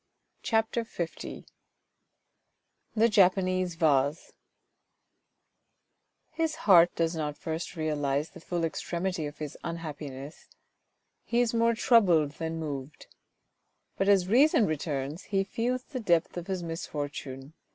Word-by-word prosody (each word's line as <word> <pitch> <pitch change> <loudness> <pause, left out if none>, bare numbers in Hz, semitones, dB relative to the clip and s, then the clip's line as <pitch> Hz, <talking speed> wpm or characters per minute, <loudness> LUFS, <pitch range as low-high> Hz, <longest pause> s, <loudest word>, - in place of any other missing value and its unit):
CHAPTER 225 +1 +1 0.2
L 170 -2 -5 1.5
THE 225 +1 +5
JAPANESE 185 -4 +3
VASE 150 -2 +1 2.0
His 325 -1 -1
heart 175 -4 +7
does 165 0 0
not 150 -2 -3
first 165 +2 -5
realise 150 -2 -1
the - - -13
full 170 0 -3
extremity 170 0 -2
of 145 0 -10
his 150 -2 -6
unhappi 160 -3 -5
ness: 135 +3 -10 0.8
he 235 - 0
is 240 -2 +2
more 230 0 +3
troubled 180 - +4
than 165 0 -3
moved. 145 -3 -6 0.8
But 195 - +1
as 190 -3 +4
reason 250 +2 +5
returns 150 0 -3
he 195 -1 +1
feels 245 +5 -2
the 260 -2 -6
depth 175 -7 +1
of 175 0 -5
his 190 -2 -3
misfortune. 145 -4 -5
170 Hz, 120 wpm, -29 LUFS, 150-200 Hz, 2.0 s, heart